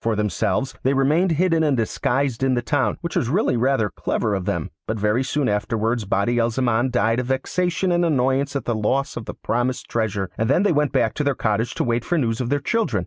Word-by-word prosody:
For 115 -1 0
themselves, 105 +4 -1
they 135 +2 +1
remained 155 +7 +2
hidden 165 0 +2
and 145 -4 +2
disguised 120 +3 -1
in 130 -1 +2
the 120 - -1
town, 130 -4 0
which 170 - -5
was 120 - 0
really 180 - +1
rather 120 -4 +1
clever 105 - -1
of 95 -2 -2
them; - - -2 0.2
but 110 -1 -2
very 105 +5 +1
soon 145 0 -1
afterwards 110 +2 -1
Badi 100 +5 +1
al 115 0 +2
Zaman 120 +1 +1
died 120 -1 +1
of 125 - -3
vexation 180 +7 0
and 175 0 +2
annoyance 135 -2 +1
at 135 -4 -2
the 120 - 0
loss 120 +6 0
of 115 - -6
the - - -7
promised 120 +2 -2
treasure, 105 -4 -2
and 110 +1 +1
then 175 +7 +3
they 205 - +3
went 150 -2 +1
back 110 - +1
to 150 - -2
their 140 -2 +1
cottage 110 +1 -1
to - - 0
wait 120 0 0
for 175 +9 0
news 115 -5 0
of 120 - -2
their 145 +1 +1
children. 145 - 0
125 Hz, 235 wpm, -22 LUFS, 115-140 Hz, 0.2 s, then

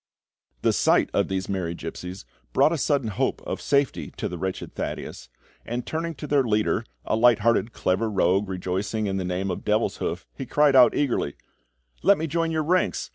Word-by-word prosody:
The - - +3
sight - - +3
of - - +2
these 95 -1 -2
merry 90 -3 -2
gipsies 90 +2 -7 0.3
brought 155 - +4
a 170 - 0
sudden 135 -5 +1
hope 95 - -1
of - - -4
safety 140 -1 +1
to - - -2
the 90 - -6
wretched 95 +1 -4
Thaddeus, - - -5 0.3
and 120 +1 -4
turning 165 +1 -3
to 150 - -7
their 145 -1 +3
leader, 110 -4 +1 0.2
a - - +1
light 115 -1 +5
hearted, 115 0 +2
clever 105 +3 0
rogue 95 0 +2
rejoicing 95 +4 -2
in 95 -1 -1
the 95 - -2
name 90 +2 -2
of 90 - -3
Devilshoof, - - -1
he - - -7
cried 145 -2 +3
out 125 -2 +7
eagerly: 125 - 0 0.7
"Let 200 0 +5
me 160 - -2
join 165 +2 0
your 160 -1 0
ranks! 180 +4 0
110 Hz, 185 wpm, -25 LUFS, 95-145 Hz, 0.7 s, out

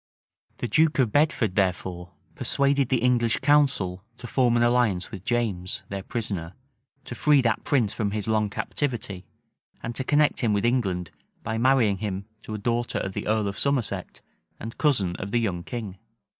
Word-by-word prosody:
The 120 - -3
duke 155 +7 +3
of 125 -6 +2
Bedford, 145 - +2
therefore, 90 -2 -1 0.2
persuaded 140 -1 +1
the 125 -3 +1
English 120 -2 +3
council 135 -11 +2
to 125 - -10
form 120 -1 +2
an 120 - +3
alliance 120 -7 +2
with 95 -5 -8
James, 105 -7 -2
their 100 0 -4
prisoner; 95 -6 -4 0.5
to - - -6
free 150 +3 +4
that 115 -3 +1
prince 120 -8 +1
from 105 -3 -1
his 105 +1 -3
long 110 -1 +1
captivity; 105 -6 -3 0.6
and 115 - -3
to 130 - -3
connect 145 +2 +3
him 115 -4 +2
with 100 +2 +1
England 95 -8 0 0.3
by 110 0 -2
marrying 120 -6 +3
him 100 -2 -3 0.2
to 110 - -6
a - - -3
daughter 120 +3 -1
of 95 - -3
the - - -4
earl 110 -1 +1
of 100 - -4
Somerset, 140 -5 -1 0.4
and 115 +1 -7
cousin 105 - +2
of 95 - -5
the 120 - +1
young 95 -7 -1
king. 105 -5 -6
110 Hz, 175 wpm, -25 LUFS, 100-125 Hz, 0.6 s, free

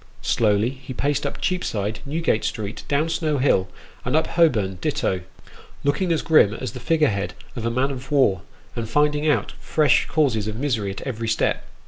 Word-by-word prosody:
Slowly 110 +1 +2
he 130 -1 -9
paced 145 +1 0
up - - -6
Cheapside, 110 - -1
Newgate 155 -6 0
Street, 105 0 -4
down 145 +3 +1
Snow 155 -2 0
Hill, 125 -8 +2 0.4
and 125 +4 -1
up 160 - +3
Holborn 105 - +2
ditto, 95 -1 0 0.6
looking 145 +6 +1
as 165 - +1
grim 115 -10 +5
as 130 +1 -4
the 125 - -8
figure 155 +4 +2
head 100 -3 -2 0.2
of 115 -2 -2
a - - +2
man 130 +4 0
of 130 +1 -8
war, 115 -11 +3 0.3
and 115 -2 -4
finding 150 +3 +2
out 120 -9 +1
fresh 155 -2 +2
causes 130 -9 +1
of 110 - -3
misery 115 -6 -1
at 95 - -6
every 115 -4 -4
step. 110 0 0
130 Hz, 180 wpm, -23 LUFS, 110-150 Hz, 0.6 s, grim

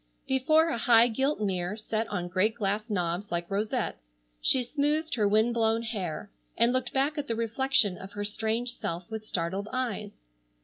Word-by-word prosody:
Before 310 +5 +4
a 235 - -1
high 235 +1 +6
gilt 265 +5 0
mirror 190 0 -1
set 220 +1 -2
on 180 -5 -3
great 190 +5 +1
glass 210 +1 -1
knobs 180 0 -1
like 170 +1 -3
rosettes, 205 - -2 0.3
she 260 - +4
smoothed 300 +5 0
her 215 -4 +2
wind 220 +3 +3
blown 225 0 +2
hair, 200 -6 -4 0.3
and 235 +2 +4
looked 255 0 0
back 280 +3 +1
at 285 - -4
the 230 - -1
reflection 230 -3 +1
of 195 +2 -10
her 205 0 -3
strange 225 +3 -1
self 170 +1 -4
with 220 -1 -6
startled 190 +4 -2
eyes. 225 -5 -4
220 Hz, 175 wpm, -28 LUFS, 200-245 Hz, 0.3 s, high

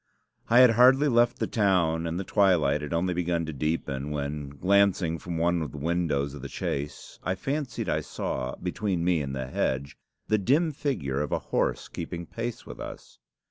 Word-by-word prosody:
I 120 +2 +7
had 125 -2 +8
hardly 130 +5 +6
left 120 -2 +3
the - - 0
town, 85 -6 +1
and 85 +2 -2
the - - -2
twilight 90 -8 +3
had 75 - -6
only 85 +2 +1
begun 85 -1 0
to 80 - -5
deepen, 75 -1 -2
when, 75 -1 -3
glancing 90 +2 +2
from 85 -2 -5
one 85 +1 +2
of 75 -5 -4
the - - -7
windows 75 -3 0
of 75 - -8
the 70 - -6
chaise, 70 +1 -5
I 95 - 0
fancied 125 0 -3
I - - +1
saw, 65 0 -4
between 90 -1 -2
me 90 -3 +2
and 70 -1 -4
the 65 -1 -3
hedge, 65 +1 -2 0.3
the 110 - +2
dim 150 - +2
figure 85 - -2
of 75 - -3
a - - +2
horse - - -1
keeping 85 +1 -6
pace 115 +5 -5
with - - -10
us. - - -9
85 Hz, 190 wpm, -27 LUFS, 75-100 Hz, 0.3 s, had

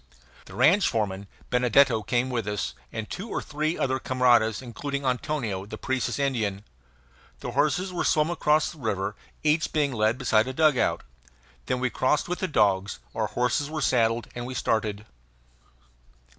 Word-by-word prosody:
The - - -12
ranch 165 - +4
foreman, 100 -3 -2 0.2
Benedetto, 125 -1 +4
came 120 +5 0
with 115 -4 -2
us, 105 -11 -2 0.2
and 110 -1 -5
two 210 +5 -6
or - - -2
three 155 +2 -2
other 130 0 0
camaradas, 120 -4 +3
including 140 +3 -5
Antonio, 125 -6 -1
the - - -7
Parecis 130 -1 -2
Indian. 110 -8 -1 0.8
The - - -4
horses 180 +5 +1
were 175 - -1
swum 155 +2 +2
across 155 -2 +2
the 160 - -14
river, 100 -4 -2 0.3
each 155 +2 +2
being 145 -3 +1
led 110 0 +1
beside 115 -3 +2
a 130 - -3
dugout. 150 -3 +2 0.6
Then 125 - 0
we 125 -1 0
crossed 130 +6 +1
with 180 0 -3
the 185 - -1
dogs; 100 - +1 0.2
our - - -1
horses 125 +4 0
were 155 0 -3
saddled, 115 -4 +1
and 120 0 -5
we 130 - -6
started. 105 -3 -1
125 Hz, 160 wpm, -26 LUFS, 110-150 Hz, 0.8 s, ranch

